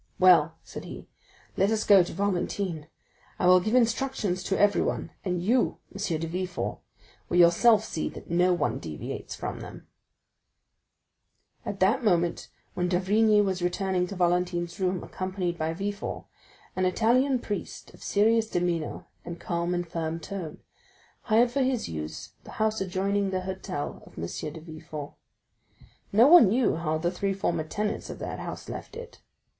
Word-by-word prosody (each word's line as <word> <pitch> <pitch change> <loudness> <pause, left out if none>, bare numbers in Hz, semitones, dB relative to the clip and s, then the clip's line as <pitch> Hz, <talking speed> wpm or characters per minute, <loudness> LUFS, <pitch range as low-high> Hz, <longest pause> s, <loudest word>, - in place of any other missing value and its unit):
"Well," 170 -4 +5
said - - -9
he, - - -9 0.5
"let 195 +2 +2
us 220 -1 +1
go 200 -2 +7
to 175 - -3
Valentine; 185 -4 -2 0.5
I - - 0
will 180 0 +7
give 215 +6 -1
instructions 230 -5 +1
to 195 - 0
everyone, 205 0 +1
and 180 -2 -2
you, 240 +6 +2 0.2
M. 195 -5 -2
de 165 - -2
Villefort, 180 +2 -3 0.5
will 175 - +1
yourself 180 +6 +6
see 160 - -3
that - - -11
no 175 +2 +3
one 130 -8 0
deviates 80 -2 -6
from - - -5
them." - - -10 1.8
40294m - - 0
At 200 - -11 0.2
the - - -11
moment 175 -5 +1 0.2
when 180 0 -1
d'Avrigny 210 +4 +3
was 190 -2 -1
returning 180 0 0
to 200 - -7
Valentine's 175 -1 0
room, 185 -1 0
accompanied 185 -2 -3
by 160 0 0
Villefort, 200 +4 -4 0.5
an 185 - +1
Italian 245 +8 +3
priest, 205 -5 -6
of - - -17
serious 220 +2 +2
demeanor 175 -3 -2 0.2
and 170 0 -7
calm 170 0 -1
and 175 0 -2
firm 165 0 -3
tone, 175 -3 -7 0.6
hired 235 +2 +4
for 275 +2 0
his 255 -2 0
use 80 -1 -6
the - - -11
house 220 -1 0
adjoining 195 +1 0
the 185 -1 -1
hotel 185 -4 -5
of - - -18
M. 80 - -3
de 150 - -6
Villefort. 155 -2 -8 1.0
No 220 +4 +6
one 310 - +8
knew 240 -1 +2
how 155 -1 -1
the 170 +2 -1
three 195 +2 -1
former 170 -4 -1
tenants 210 +6 -3
of - - -6
that - - -5
house - - -7
left - - -7
it. 475 +1 -10
185 Hz, 160 wpm, -27 LUFS, 170-205 Hz, 1.8 s, one